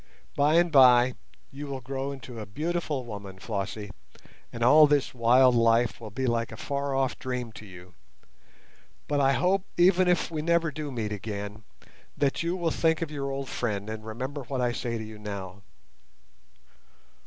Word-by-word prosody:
By 145 +2 +3
and 170 0 +4
by 125 -3 +6 0.4
you 145 +1 -7
will 135 -1 -4
grow 135 +2 -4
into 125 -3 -9
a 105 - -7
beautiful 155 - -3
woman, 100 -4 -8
Flossie, 105 +1 -4 0.6
and 115 - -4
all 150 +5 +7
this 145 -2 +1
wild 125 +1 +5
life 115 0 +2
will 110 - -7
be 130 +6 -3
like 115 -1 0
a 115 - -8
far 140 +1 -2
off 135 -1 0
dream 125 -2 -4
to 105 -1 -12
you; 90 -1 -13 1.1
but 145 -1 0
I 135 0 +4
hope, 185 +5 +2
even 180 +1 +5
if 180 -1 +1
we 155 -2 -2
never 170 0 +1
do 150 -1 -5
meet 110 -4 -3
again, 105 +1 -6 0.5
that 140 -1 +1
you 170 +2 -1
will 170 -3 -1
think 160 +1 +1
of 155 - -6
your 140 -2 -3
old 135 0 -4
friend 105 -2 -3
and 110 0 -6
remember 130 +6 -5
what 130 +1 -4
I 120 -1 +1
say 120 -1 -3
to 110 - -5
you 110 -1 -10
now. 100 -2 -7
130 Hz, 175 wpm, -27 LUFS, 110-145 Hz, 1.1 s, all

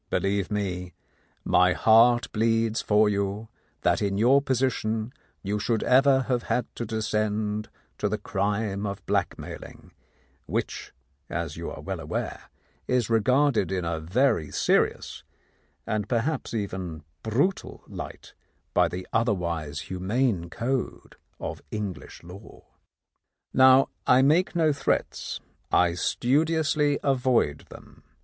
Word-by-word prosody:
Believe 100 -1 0
me, 90 -4 -3 0.5
my 90 0 +4
heart 115 +3 +5
bleeds 115 0 +1
for 105 0 +3
you 100 +2 -2 0.3
that - - +2
in 100 -1 0
your 130 +6 +5
position 125 -4 -1 0.3
you 105 +1 -1
should 110 +1 0
ever 135 +1 +5
have 125 -2 -1
had 125 - +1
to 120 - -4
descend 105 0 -1 0.3
to 105 - 0
the 105 - -1
crime 100 0 -2
of 100 -1 -6
blackmail - - -2
ing, - - -14 0.6
which, - - -3 0.4
you - - -4
are - - -8
well - - -4
aware, - - -4 0.4
is 125 -3 +1
regarded 125 -1 +3
in 90 -2 -1
a 85 -1 -2
very 95 - +1
serious - - 0 0.6
and 105 -2 -2
perhaps 130 +5 -1
even 90 -7 -4 0.2
brutal 140 - -1
light - - -9 0.4
by - - +4
the 90 +1 -6
other 115 -2 +2
wise 80 -5 -3
humane 95 0 -1
code 125 +6 -3 0.2
of - - -5
English 100 -7 -6
law. 95 +5 -13 0.9
"Now 130 +1 +6 0.2
I 130 +1 +6
make 165 +7 +3
no 160 -3 +3
threats; 140 - -2 0.3
I 90 -1 +4
studiously 150 - +1
avoid 125 - +1
them. - - -14
110 Hz, 125 wpm, -26 LUFS, 100-130 Hz, 0.9 s, Now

